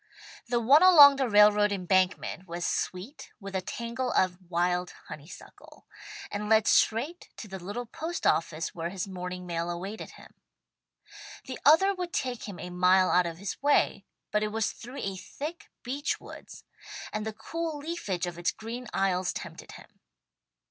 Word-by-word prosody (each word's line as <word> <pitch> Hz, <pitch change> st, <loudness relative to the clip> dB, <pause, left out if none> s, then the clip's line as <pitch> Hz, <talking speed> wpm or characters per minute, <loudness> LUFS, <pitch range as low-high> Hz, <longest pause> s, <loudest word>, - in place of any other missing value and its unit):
The 240 Hz, 0 st, +1 dB
one 270 Hz, +7 st, +6 dB
along 295 Hz, -7 st, +9 dB
the 265 Hz, -3 st, 0 dB
railroad 210 Hz, 0 st, +5 dB
embankment 185 Hz, -1 st, 0 dB
was 170 Hz, 0 st, -4 dB
sweet 195 Hz, +11 st, -4 dB
with 195 Hz, -2 st, -8 dB
a 190 Hz, -, 0 dB
tangle 235 Hz, +6 st, -4 dB
of 185 Hz, 0 st, +1 dB
wild 180 Hz, +1 st, 0 dB, 0.2 s
honeysuckle, 150 Hz, +3 st, -12 dB, 0.5 s
and 210 Hz, +1 st, -4 dB
led 220 Hz, -1 st, +5 dB
straight 280 Hz, +11 st, +2 dB
to 220 Hz, -, -8 dB
the 190 Hz, -1 st, -7 dB
little 210 Hz, +6 st, -5 dB
post 325 Hz, +9 st, -5 dB
office 165 Hz, 0 st, 0 dB
where 170 Hz, 0 st, -4 dB
his 185 Hz, +1 st, -4 dB
morning 180 Hz, -1 st, -6 dB
mail 170 Hz, -1 st, -3 dB
awaited 190 Hz, +5 st, -6 dB
him. -, -, -16 dB, 1.1 s
The 255 Hz, -, -7 dB
other 355 Hz, +7 st, +6 dB
would 360 Hz, -2 st, -5 dB
take 250 Hz, -3 st, -2 dB
him 195 Hz, -, -8 dB
a 180 Hz, -, -7 dB
mile 185 Hz, +1 st, +4 dB
out 180 Hz, -1 st, +4 dB
of 165 Hz, -1 st, -6 dB
his 195 Hz, +2 st, -6 dB
way, 285 Hz, +1 st, +2 dB, 0.3 s
but 210 Hz, -, +1 dB
it 215 Hz, -, 0 dB
was 220 Hz, 0 st, 0 dB
through 250 Hz, +4 st, -9 dB
a 195 Hz, -1 st, -3 dB
thick 305 Hz, -, -7 dB
beech 275 Hz, +4 st, -2 dB
woods, -, -, -12 dB, 0.5 s
and 215 Hz, -, -2 dB
the 220 Hz, -, -3 dB
cool 330 Hz, +6 st, -4 dB
leafage 285 Hz, -, -3 dB
of 175 Hz, -1 st, -6 dB
its 175 Hz, -, +1 dB
green 235 Hz, +3 st, -7 dB
aisles 185 Hz, -2 st, +1 dB
tempted -, -, -8 dB
him. -, -, -15 dB
205 Hz, 165 wpm, -28 LUFS, 180-255 Hz, 1.1 s, along